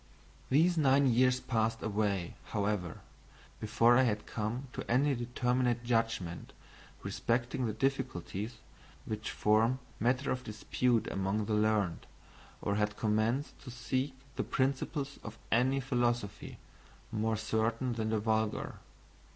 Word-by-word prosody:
These 165 +5 +4
nine 140 -1 +5
years 125 +1 +4
passed 115 -2 0
away, 100 -4 0
however, 100 -4 -2 0.6
before 115 +2 +4
I - - +6
had 105 -5 0
come 115 +5 -3
to - - -4
any 135 +4 +3
determinate 125 0 0
judgment 115 -8 -1 0.5
respecting 120 +1 -1
the 110 - -2
difficulties 110 -3 -2 0.5
which 110 -1 -4
form 110 +4 +3 0.2
matter 130 +4 +1
of 130 0 -2
dispute 115 +2 0
among 95 +2 0
the 110 - -1
learned, 105 -5 +1 0.6
or 100 - 0
had 105 0 0
commenced 110 +6 0
to 130 - -9
seek 130 +3 -2 0.2
the - - +1
principles 135 +1 -1
of 105 +1 -8
any 130 +4 +3
philosophy 120 -5 -1 0.5
more 110 0 0
certain 110 +3 0
than 110 -1 -2
the 110 - +1
vulgar. 110 0 0
115 Hz, 125 wpm, -32 LUFS, 105-125 Hz, 0.6 s, I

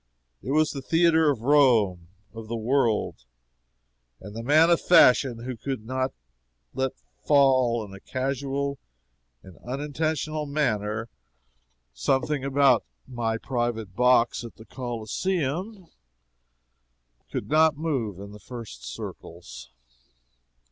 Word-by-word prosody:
It - - -8
was 155 +2 +2
the 140 - -6
theatre 160 +1 +3
of 135 -6 -1
Rome 115 -11 +3 0.3
of 115 -1 -9
the 115 - -4
world 115 - 0 1.0
and 105 +2 -11
the 115 - -4
man 155 +7 +4
of 170 - +3
fashion 130 -7 +5
who 130 0 -5
could 130 -2 -5
not 130 +2 -2 0.6
let 130 0 -1 0.3
fall 130 -5 +3
in 100 - -13
a 100 - -10
casual 135 +3 -3 0.6
and 95 -3 -15
unintentional 150 +3 -3
manner 110 -7 -1 0.9
something 135 - 0
about 135 -3 +3 0.2
"my 115 -3 -2
private 120 -5 -3
box 125 -1 +3
at 115 - -10
the 110 - -14
Coliseum" 145 - -3 1.5
could - - -4
not 155 0 +3
move 130 - -2
in 100 +1 -9
the 105 - -12
first 115 - -9
circles. - - -9
130 Hz, 115 wpm, -25 LUFS, 115-145 Hz, 1.5 s, fashion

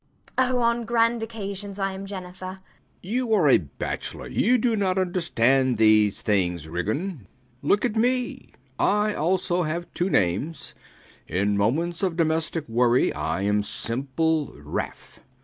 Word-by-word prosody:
Oh, 255 -1 +2
on 235 0 +1
grand 230 0 +2
occasions 200 -3 -5
I 195 -1 -1
am 195 +1 -7
Jennifer. 185 -1 -7
B. - - -30 0.5
B. 215 - -2
You 250 -3 +1
are 175 -8 +3
a 135 - +6
bachelor: 70 -5 -5
you 250 +3 +2
do 235 -1 +1
not 190 -3 0
understand 135 - +2
these 110 -2 +4
things, 90 -6 +1
Ridgeon. 110 - -3 0.3
Look 200 - +2
at 235 -3 -1
me 250 +2 +1
[They - - -17
look]. - - -28 0.2
I 210 +1 +2
also 180 +2 0
have 170 +1 -2
two 180 +2 0
names. 100 - 0 0.5
In 100 +2 0
moments 160 - 0
of 180 -4 0
domestic 160 -1 0
worry, 120 +2 +3
I 80 +5 -2
am 105 +1 +2
simple 140 +8 -1
Ralph. - - -6
170 Hz, 150 wpm, -25 LUFS, -, 0.5 s, a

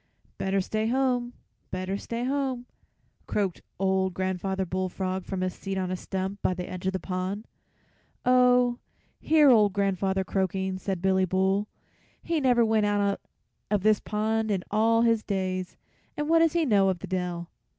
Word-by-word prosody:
"Better 195 0 +1
stay 215 +3 -1
home, 245 -1 0 0.4
better 185 +1 -3
stay 230 +4 -4
home," 265 -2 -1 0.6
croaked 195 -4 -1 0.2
old 190 -1 +1
Grandfather 190 +1 -1
Bullfrog 185 +1 -3
from 190 -1 -3
his 185 -1 -1
seat 195 -1 -5
on 185 -1 -2
a - - 0
stump 190 +2 -4
by 185 - +1
the 180 0 -5
edge 185 0 -5
of 190 - 0
the 190 - -1
pond. 185 +4 -3 0.8
"Oh, 250 -1 +4 0.4
hear 305 -3 +5
old 210 -4 +5
grandfather 195 -1 0
croaking!" 190 0 -1
said 190 -2 -3
Billy 190 0 +3
Bull; 190 +3 +1 0.6
"he 335 -2 0
never 245 -3 +4
went 220 -1 +2
out 205 -1 +1 0.5
of 205 -2 +1
this 215 -1 +4
pond 220 +1 -1
in 195 -3 0
all 225 +2 +3
his 230 -2 +3
days, 185 -3 -3 0.4
and 295 0 -1
what 330 +1 +5
does 330 -1 +3
he 340 -2 +2
know 200 -6 +4
of 185 - 0
the - - -7
dell?" 180 -2 -3
195 Hz, 165 wpm, -27 LUFS, 185-230 Hz, 0.8 s, hear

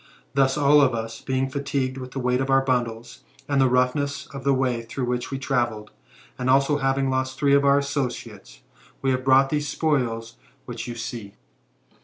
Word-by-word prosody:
Thus, 135 0 +2
all 145 0 +5
of 130 -4 +3
us 115 0 -5
being 130 0 -1
fatigued 135 -1 -2
with 130 0 -7
the 135 - -5
weight 125 0 +1
of 135 - -1
the 135 0 +4
bundles, 120 -2 -2 0.2
and 140 -1 +2
the 130 - +4
roughness 140 +2 0
of 135 -1 -7
the 140 - +2
way 130 -3 0
through 120 +3 -4
which 125 0 -2
we 135 - -3
travelled, 120 -6 -2 0.5
and 125 0 -1
also 135 +2 +3
having 135 0 +1
lost 130 0 -2
three 140 0 +2
of 140 0 +5
our 140 0 +5
associates, 140 - -4 0.4
we 135 - +2
have 130 0 -1
brought 135 +1 +4
these 150 -1 -1
spoils 120 -7 -1 0.3
which 115 -1 -6
you 120 - -5
see." 115 -3 -7
130 Hz, 190 wpm, -24 LUFS, 120-140 Hz, 0.5 s, all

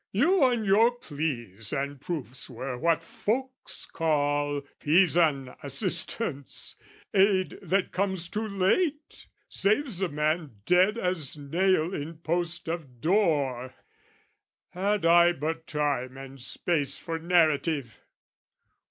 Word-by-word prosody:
"You 300 - +4
and 240 -4 +1
your 210 +4 +5
pleas 140 - -4
and 140 -1 -3
proofs 145 -7 -5
were 130 +1 -5
what 165 +5 +1
folks 260 +9 -3
call 145 -2 0 0.2
"Pisan 155 -5 +3
assistance, 145 - -1 0.4
aid 190 -1 +3
that 195 0 0
comes 190 -3 -1
too 215 +5 -3
late, 285 - 0 0.2
"Saves 210 0 0
a 190 - +1
man 150 -2 -1
dead 185 +5 +4
as 180 - 0
nail 170 +4 +1
in 155 +1 -5
post 170 +1 -2
of 155 -7 -5
door. 145 - +1 0.9
"Had 195 +1 -1
I 170 +1 +6
but 160 +1 -4
time 140 -4 -1
and 135 -1 -10
space 145 +1 0
for 165 0 -4
narrative! 160 - +1
165 Hz, 110 wpm, -27 LUFS, 145-190 Hz, 0.9 s, I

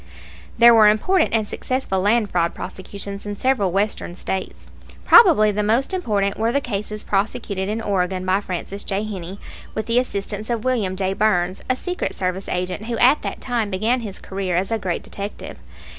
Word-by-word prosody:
There 235 0 +8
were 220 -2 +7
important 315 - +3
and 220 -2 +1
successful 255 -7 -2
land 210 +2 +2
fraud 170 -1 0
prosecutions 200 +1 -7
in 205 - -3
several 225 -5 +1
Western 195 -2 -1
States. 190 0 -5 0.4
Probably 275 - +7
the 210 +1 -1
most 230 - +1
important 205 - 0
were 225 +1 +1
the 280 - +2
cases 210 -4 -4
prosecuted 195 -1 -1
in 220 +2 -2
Oregon 185 -2 -1
by 190 +2 +2
Francis 195 +1 -5
J. 200 +1 -2
Heney, 190 -3 -6 0.4
with 220 - -2
the 235 +2 +3
assistance 210 -2 -4
of 230 -2 -1
William 220 -8 0
J. 190 0 -1
Burns, 190 -3 +1
a 255 - +3
secret 360 +7 -4
service 185 +1 -3
agent 180 +4 -3
who 235 -1 -2
at 255 +6 +5
that - - -5
time 235 -5 -1
began 220 +6 +1
his 210 -5 -6
career 190 -2 -3
as 190 +4 0
a 225 - 0
great 180 -4 -3
detective. 200 +1 -7
205 Hz, 180 wpm, -21 LUFS, 190-230 Hz, 0.4 s, There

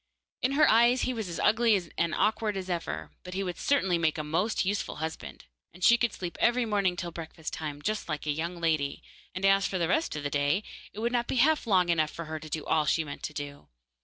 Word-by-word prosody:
In 260 +2 +1
her 300 +1 +5
eyes 235 +3 +5
he 255 - 0
was 220 -6 -4
as 170 - -5
ugly 220 -2 +4 0.2
and 170 -1 0
awkward 215 -1 +1
as 185 -1 -4
ever, 170 -1 -4
but 180 0 -8
he 195 - -1
would 180 -2 -4
certainly 190 -12 +2
make 160 -2 +1
a 155 - -2
most 165 +9 0
useful 205 +2 -1
husband, 160 +1 -6 0.3
and 180 - -10
she 235 - +7
could 240 -1 +1
sleep 175 -3 -6
every 240 0 +3
morning 200 -4 +1
till 175 -1 -4
breakfast 160 -1 -7
time, 145 -2 -5
just 215 -4 -2
like 155 -1 -3
a 150 - +1
young 170 +4 -3
lady, 155 -4 0 0.3
and 185 +1 -1
as 195 0 +4
for 190 - -2
the 170 -2 +1
rest 315 - 0
of 150 - -4
the 145 - -2
day, 145 +7 +1 0.3
it 215 - -7
would 235 +1 0
not 240 -1 0
be - - -2
half 295 +1 +3
long 185 -4 +3
enough 160 -2 +2
for 155 -1 -6 0.2
all 155 -1 +2
she 160 - +2
meant 145 -2 -8
to 150 - -5
do. 145 -1 -7
180 Hz, 235 wpm, -29 LUFS, 160-220 Hz, 0.3 s, she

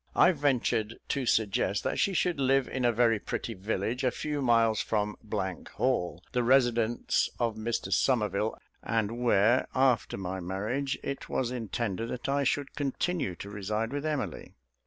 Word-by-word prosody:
I - - +6
ventured 125 -7 0
to 135 -3 -1
suggest 100 -3 +1
that - - -1
she 195 - +2
should 175 -3 +1
live 135 -1 +3
in 130 -2 -2
a 120 - +5
very 115 -1 +3
pretty 115 - -4
village 110 +5 -2
a 130 - +4
few 150 +3 -3
miles 115 -3 +3
from 105 -2 -1 0.6
Hall, 95 -8 0
the 125 - +1
residence 120 -2 +2
of 120 -2 +1
Mr 110 -3 -2
Somerville, 105 -3 +1 0.2
and 115 +1 -1
where, 120 +1 +4
after 130 -3 +2
my 95 0 -4
marriage, 105 +10 -2
it 140 - -5
was 125 -2 -1
intended 115 -2 -3
that 125 +1 -4
I 140 +1 +1
should 140 +1 0
continue 145 - -1
to 100 - -8
reside 105 +4 -2
with 145 0 -2
Emily. 135 - -3
115 Hz, 155 wpm, -29 LUFS, 105-130 Hz, 0.6 s, I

